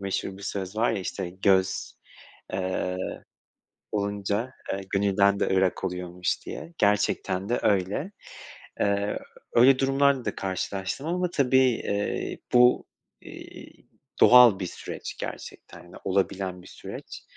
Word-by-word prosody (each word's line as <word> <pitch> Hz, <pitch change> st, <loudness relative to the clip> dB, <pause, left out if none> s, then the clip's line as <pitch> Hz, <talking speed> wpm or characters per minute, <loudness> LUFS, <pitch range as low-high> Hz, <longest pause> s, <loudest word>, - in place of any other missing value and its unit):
meşhur 95 Hz, 0 st, -3 dB
bir -, -, -12 dB
söz 100 Hz, 0 st, -4 dB
var 115 Hz, +2 st, +2 dB
ya, -, -, -1 dB
işte, 95 Hz, -1 st, -4 dB
göz, 95 Hz, 0 st, +1 dB, 0.6 s
eee, 95 Hz, -1 st, -2 dB, 0.9 s
olunca, 100 Hz, +3 st, -2 dB, 0.2 s
eee, 100 Hz, -, -3 dB
gönülden 100 Hz, 0 st, +3 dB
de -, -, +1 dB
ırak 95 Hz, -1 st, +1 dB
oluyormuş 90 Hz, 0 st, -3 dB
diye, 170 Hz, -, -8 dB
gerçekten 100 Hz, -1 st, +1 dB
de 120 Hz, -, +1 dB
öyle. 100 Hz, -, 0 dB, 0.7 s
Eee, 100 Hz, 0 st, +1 dB, 0.3 s
öyle 130 Hz, +3 st, +6 dB
durumlarda 135 Hz, -1 st, +2 dB
da 105 Hz, -, -2 dB
karşılaştım 95 Hz, -, -3 dB
ama 180 Hz, +1 st, -1 dB
tabii, 130 Hz, -5 st, +3 dB
eee, 115 Hz, -5 st, 0 dB
bu, 125 Hz, 0 st, +5 dB, 0.3 s
iii, -, -, -12 dB, 0.3 s
doğal 120 Hz, -5 st, +8 dB
bir 90 Hz, -, -3 dB
süreç -, -, -7 dB
gerçekten 90 Hz, 0 st, -9 dB
de -, -, -12 dB
olabilen 95 Hz, -1 st, -1 dB
bir -, -, -16 dB
süreç. -, -, -9 dB
100 Hz, 125 wpm, -26 LUFS, 95-120 Hz, 0.9 s, doğal